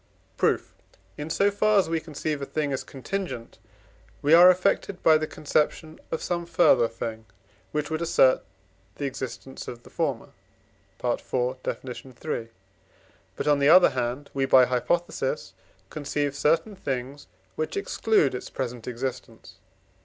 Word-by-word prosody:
Proof. - - 0 0.4
In 150 +7 -6
so 200 +5 +2
far 215 +1 +3
as 195 - +4
we 165 0 0
conceive 155 -2 -4
a - - -2
thing 150 -3 -1
as 130 - -3
contingent, 135 -4 -5 0.6
we 145 +2 +4
are 175 +2 +10
affected 185 +1 +1
by 160 - +7
the 155 - -2
conception 155 +1 -1
of 160 - -3
some 170 -1 -2
further 165 -8 +4
thing, 110 -1 -6 0.5
which 150 +1 -2
would 160 +1 -1
assert 135 -6 +4 0.5
the 145 - -4
existence 130 0 -6
of 120 0 -8
the - - -16
former - - -2 0.7
(IV. 125 +1 -1
Def. - - -4
iii.); 125 -2 -6 0.9
but, - - -4
on 145 -1 +4
the 140 +1 +4
other 180 +2 +8
hand, 125 +3 -3
we 135 -1 +1
(by 130 -1 +7
hypothesis) 130 +8 -1 0.4
conceive 145 -1 -2
certain 165 +8 +1
things, 135 -4 -5 0.3
which 155 - -3
exclude 220 - +2
its 125 - -6
present 120 -3 -5
existence. 120 -6 -6
145 Hz, 145 wpm, -26 LUFS, 125-165 Hz, 0.9 s, are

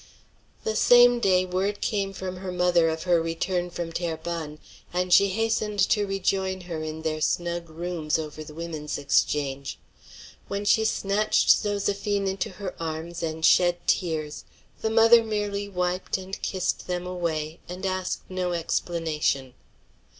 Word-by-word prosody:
The 220 - -1
same 245 +1 +6
day 185 -4 +3
word 190 +3 -1
came 200 -3 -1
from 185 -1 -6
her 185 0 -5
mother 175 -2 +3
of 160 0 -3
her 175 -2 +3
return 175 +2 -1
from 170 -1 -5
Terrebonne, 165 -2 -4 0.3
and 180 0 0
she 200 - +7
hastened 215 +1 -1
to 205 -2 +2
rejoin 190 -1 -1
her 170 -3 -5
in 155 0 -5
their 155 -1 -2
snug 170 +1 -1
rooms 165 -1 -2
over 155 -1 -6
the 150 0 -12
Women's 160 -3 -4
Exchange. 140 -1 0 0.7
When 200 +1 -3
she 220 +2 +4
snatched 210 0 +1
Zoséphine 205 0 +2
into 190 0 -1
her 185 0 -6
arms 165 +1 -4
and 160 -1 -1
shed 175 -1 +5
tears, 155 -4 -1 0.4
the 220 - 0
mother 230 +1 +6
merely 205 -2 -2
wiped 180 0 -1
and 190 +1 -7
kissed 185 -1 -2
them 180 0 -2
away, 165 -3 -3
and 180 +2 -5
asked 185 -1 -2
no 185 -1 -2
explanation. 160 -5 -1
180 Hz, 145 wpm, -26 LUFS, 165-195 Hz, 0.7 s, she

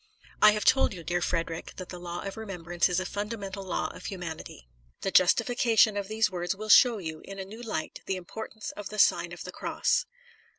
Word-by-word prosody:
I 210 0 +8
have 210 -1 -2
told 260 -6 +4
you, 170 - -9
dear 175 +2 -1
Frederic, 165 -1 -2
that 185 -1 -8
the 180 - -7
law 175 0 -5
of 195 -1 -5
remembrance 175 -6 -1
is 180 0 +1
a 185 - -3
fundamental 200 -1 -4
law 190 - -2
of 180 - -11
humanity. 165 - -7 0.3
The 195 - -1
justification 230 +3 +4
of 200 -1 -2
these 220 0 +1
words 175 +1 -2
will 215 +2 -7
show 235 +2 +7
you, 160 -5 -6
in 195 - -9
a 190 - -5
new 220 +5 -10
light, 215 -9 -4
the 190 - 0
importance 220 +4 -7
of 205 -2 -7
the 215 - -7
Sign - - +4
of - - -8
the - - -7
Cross. - - 0
195 Hz, 210 wpm, -28 LUFS, 175-215 Hz, 0.3 s, I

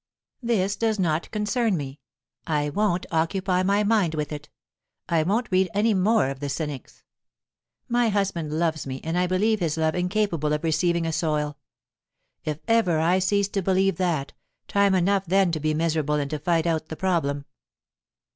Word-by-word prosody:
"This 205 -5 0
does 220 0 0
not 170 -4 0
concern 210 -1 0
me; 140 -1 -6 0.5
I 150 -2 0
won't 200 -1 0
occupy 180 +3 +1
my 200 +2 +2
mind 205 -7 +2
with 150 -1 -3
it; 150 0 -7 0.6
I 165 -2 +2
won't 210 +9 0
read 185 0 +3
any 215 +2 +3
more 200 -4 +2
of 135 - -8
the 145 0 -4
cynics. 145 -1 -5 0.8
My 240 -2 +2
husband 195 -7 -1
loves 160 -2 -1
me, 130 0 -4
and 165 +1 -2
I 180 0 +2
believe 210 +4 +1
his 165 -4 -1
love 160 0 +1
incapable 180 -5 0
of 150 - -2
receiving 170 +1 +1
a 165 - -1
soil. 150 -2 -1 0.9
If 150 -1 -3
ever 225 -8 +3
I 175 +4 +3
cease 200 +1 +1
to 200 - -1
believe 190 +1 +1
that, 170 -7 -1 0.3
time 200 -1 +3
enough 190 +1 +1
then 190 0 +3
to 160 - -2
be 155 0 0
miserable 155 -2 0
and 145 -1 -2
to 155 - -2
fight 165 +1 +1
out 160 -2 0
the 160 - -6
problem." 150 -6 -1
175 Hz, 175 wpm, -25 LUFS, 155-200 Hz, 0.9 s, read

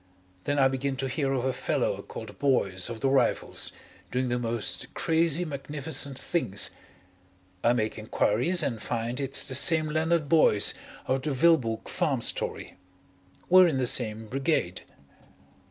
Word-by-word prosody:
Then 145 0 0
I 135 -1 +5
begin 135 +1 -2
to 135 0 -3
hear 135 +1 -1
of 130 -2 -1
a 130 - 0
fellow - - -1
called 105 -4 -10
Boyce 100 -10 +1
of 115 -1 -7
the 135 - +2
Rifles 135 0 0 0.4
doing 125 0 -1
the 120 0 0
most 115 -2 -3
crazy 165 +1 +1
magnificent 140 -1 -4
things. 115 - 0 0.9
I 120 - +4
make 110 -2 -2
enquiries 120 - +1
and 115 -7 -2
find 120 +2 -3
it's 135 -1 +1
the - - -4
same 155 +3 +3
Leonard 160 0 +1
Boyce 140 -9 +4 0.3
of 130 0 0
the 155 - -3
Vilboek 130 -6 +2
Farm 145 -8 -1
story. - - -3 0.7
We're 185 0 +7
in 155 -5 0
the 130 - +1
same 110 -2 +1
Brigade. 130 - -1
135 Hz, 150 wpm, -27 LUFS, 115-150 Hz, 0.9 s, We're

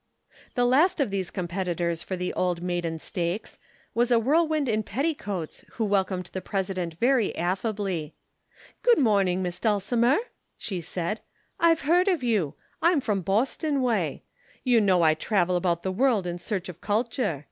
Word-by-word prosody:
The 245 - +3
last 310 +9 +4
of 270 -8 +1
these 190 -3 -2
competitors 175 -2 -2
for 190 - -4
the 180 0 -3
Old 175 -1 -1
Maiden 175 -2 -2
Stakes 175 +5 -4 0.3
was 240 +1 +2
a 240 - +5
whirlwind 305 +4 +2
in 215 -2 +1
petticoats 210 - -3
who 225 - -1
welcomed 190 -2 0
the 190 - -3
President 185 -4 -3
very 240 +3 +2
affably. 185 -3 -2 0.7
"Good 485 -1 +5
morning, 195 -7 +2
Miss 175 -1 -4
Dulcimer," 230 +4 +2 0.4
she 185 -4 -4
said. 175 +5 -3 0.4
"I've 330 -1 +4
heard 350 +6 +3
of 350 -9 +1
you. 200 - +1 0.3
I'm 340 -2 +4
from 210 -7 -1
Boston 265 - 0
way. 240 -3 0 0.4
You 245 -3 +4
know 185 -4 +3
I 155 -1 +5
travel 180 +2 +1
about 175 -1 0
the 190 - -1
world 225 -1 +2
in 175 0 -3
search 190 +1 -3
of 180 - -9
culture. 220 - -1
200 Hz, 160 wpm, -26 LUFS, 180-245 Hz, 0.7 s, a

